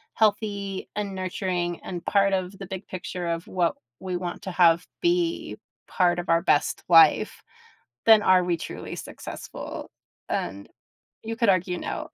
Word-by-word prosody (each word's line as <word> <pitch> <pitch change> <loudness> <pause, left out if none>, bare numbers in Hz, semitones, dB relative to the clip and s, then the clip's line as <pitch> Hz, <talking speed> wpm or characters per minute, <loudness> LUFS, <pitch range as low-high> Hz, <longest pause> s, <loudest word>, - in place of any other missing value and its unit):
healthy 200 -3 0
and 205 -2 -3
nurturing 180 -2 -2
and 175 -2 -6
part 200 -1 +3
of 185 0 -2
the 195 - -6
big 190 0 -7
picture 180 -1 -5
of 170 0 -3
what 175 -3 0 0.2
we 185 -2 -3
want 175 -1 -5
to 190 - -4
have 175 -1 +4
be 345 -1 0 0.3
part 175 -2 +2
of 175 - -6
our 165 0 +4
best 145 - +1
life, 165 -3 +5 0.6
then 220 -2 +8
are 185 -2 +5
we 175 -1 +1
truly - - -7
successful? - - -8 0.4
And 100 +1 -3 0.6
you 225 0 -4
could 230 -3 +2
argue 180 -1 +2
no. - - -5
185 Hz, 155 wpm, -25 LUFS, 175-200 Hz, 0.6 s, then